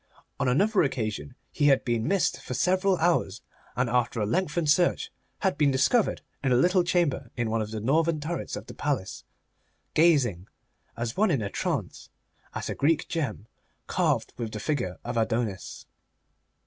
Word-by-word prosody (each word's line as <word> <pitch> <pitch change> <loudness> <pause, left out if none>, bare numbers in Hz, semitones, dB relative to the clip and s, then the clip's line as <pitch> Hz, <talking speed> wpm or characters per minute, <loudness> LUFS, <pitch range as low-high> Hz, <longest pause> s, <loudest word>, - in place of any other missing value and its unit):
On - - +1
another 195 - +3
occasion 125 -2 -2 0.2
he 145 - +2
had 135 -2 +4
been 120 -2 0
missed 195 -5 +1
for 125 - -5
several 185 +3 +2
hours, 160 - +1 0.3
and 125 0 +1
after 120 -1 0
a 105 - +1
lengthened 165 - +1
search 175 +2 +2 0.3
had 190 -4 0
been 145 -2 +4
discovered 140 - +2 0.2
in 135 - +1
a - - +5
little 180 +8 +4
chamber 170 -8 0
in 120 -2 -1
one 115 0 +1
of 105 - -4
the 110 0 -4
northern 155 +7 +1
turrets 165 +3 -4
of - - -7
the - - -10
palace 135 -10 -3 0.7
gazing, 130 - +3 0.5
as 115 0 -3
one 215 +2 +3
in 135 -10 +1
a 100 - -4
trance, - - -3 0.5
at - - -3
a - - -2
Greek 155 +3 +1
gem 150 -10 -3 0.4
carved - - 0
with 115 -2 -4
the 105 - -4
figure 120 -8 -2
of 120 0 -4
Adonis. 110 -3 -2
135 Hz, 170 wpm, -27 LUFS, 115-170 Hz, 0.7 s, a